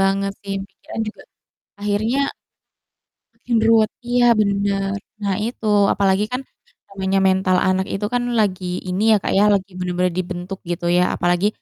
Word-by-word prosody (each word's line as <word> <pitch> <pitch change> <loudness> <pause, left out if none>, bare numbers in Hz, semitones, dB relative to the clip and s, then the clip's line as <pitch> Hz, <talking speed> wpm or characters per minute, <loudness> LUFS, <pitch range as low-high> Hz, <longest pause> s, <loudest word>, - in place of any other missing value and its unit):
banget 195 +1 +1
sih 195 -1 -4
pikiran - - -8
juga 215 - -10 0.6
akhirnya 210 +5 0 1.2
makin 235 -2 -2
ruwet 220 -2 +4 0.2
iya 245 0 +3 0.2
bener. 200 -1 0 0.2
Nah 200 -1 0
itu 230 -1 -6 0.3
apalagi 195 0 +2
kan 250 - -2 0.5
namanya 195 0 0
mental 185 -1 +2
anak 185 0 +1
itu 195 +2 -2
kan 245 0 +1 0.2
lagi 190 -3 0 0.2
ini 185 +2 -2
ya - - +7
Kak - - -1
ya, 205 - +5
lagi 195 -1 -1
bener-bener 180 0 0
dibentuk 185 +1 -5
gitu 175 0 -3
ya, 180 - +4
apalagi 175 +3 +1
195 Hz, 150 wpm, -20 LUFS, 185-210 Hz, 1.2 s, ya